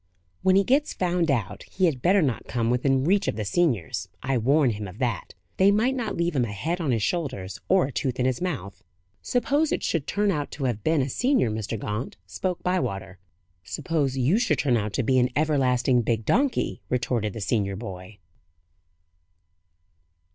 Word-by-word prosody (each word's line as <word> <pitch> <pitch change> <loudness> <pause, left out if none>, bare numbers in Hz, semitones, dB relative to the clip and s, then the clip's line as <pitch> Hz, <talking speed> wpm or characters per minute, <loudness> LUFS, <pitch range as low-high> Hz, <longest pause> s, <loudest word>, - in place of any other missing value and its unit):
When 190 0 +4
he 195 - +5
gets 280 +7 +1
found 175 -2 0
out, 105 -7 -1
he 190 - -1
had 145 -8 0
better 185 +3 +4
not 130 -6 -2
come 115 -1 0
within 130 +2 +2
reach 195 +6 +2
of - - 0
the 105 -1 -3
seniors; 100 - 0
I 135 +1 0
warn 135 +3 +3
him 105 -1 -5
of 90 +2 -11
that: 120 -7 -2 0.2
they 190 +1 +5
might 220 +6 +3
not 235 -5 -3
leave 170 -1 0
him 130 - +2
a 105 - -5
head 165 - -2
on 155 - -1
his 115 -4 +1
shoulders, 130 - -2
or 190 -3 +4
a 140 - -5
tooth 130 -1 -2
in 125 - +2
his 130 +2 0
mouth." 130 - -4 0.4
"Suppose 285 +5 +1
it - - -1
should 160 -5 -1
turn 205 0 +1
out 150 -5 -2
to 140 - -5
have 120 -5 -1
been 155 -3 +2
a - - -2
senior, 245 - +1
Mr. 110 +1 -3
Gaunt?" 105 +4 -4
spoke 175 - -3
Bywater. 95 - -2 0.4
"Suppose 140 - -1
you 140 - +3
should 240 - +1
turn 130 -5 +2
out 105 -2 -1
to 135 - 0
be 130 +2 +3
an 125 0 +3
everlasting 130 -5 +2
big 115 -1 -1
donkey?" 265 - +1
retorted 120 -4 -1
the - - -6
senior 100 -2 0
boy. 95 -1 -8
130 Hz, 190 wpm, -25 LUFS, 110-175 Hz, 0.4 s, he